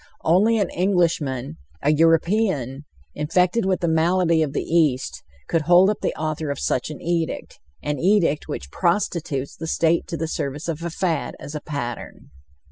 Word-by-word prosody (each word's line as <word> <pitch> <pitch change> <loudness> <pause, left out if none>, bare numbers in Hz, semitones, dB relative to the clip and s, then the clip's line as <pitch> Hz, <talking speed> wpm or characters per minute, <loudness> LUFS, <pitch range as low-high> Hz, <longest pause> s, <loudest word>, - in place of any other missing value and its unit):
Only 205 +8 +4
an 200 -4 0
Englishman, 165 - 0 0.3
a 145 - +4
European, 165 - +2 0.3
infected 180 +8 +1
with 185 -2 0
the 170 - +1
malady 165 +1 +2
of 150 -3 0
the - - -2
East, 155 -6 +1 0.3
could 165 - +1
hold 175 +5 +5
up 210 - -4
the - - -1
author 155 -1 -2
of 140 - -3
such 125 - -1
an 150 - -7
edict, 170 -1 -3 0.2
an 150 0 -2
edict 175 -5 +2
which 70 +1 -6
prostitutes 170 - -1
the 165 - -6
State 165 +1 +1
to 165 - -4
the 160 - -2
service 150 -1 -4
of 165 -1 -3
a 170 - -3
fad 165 -3 -2
as 140 +2 -8
"a 150 - -4
pattern." 120 - -6
165 Hz, 170 wpm, -23 LUFS, 145-175 Hz, 0.3 s, hold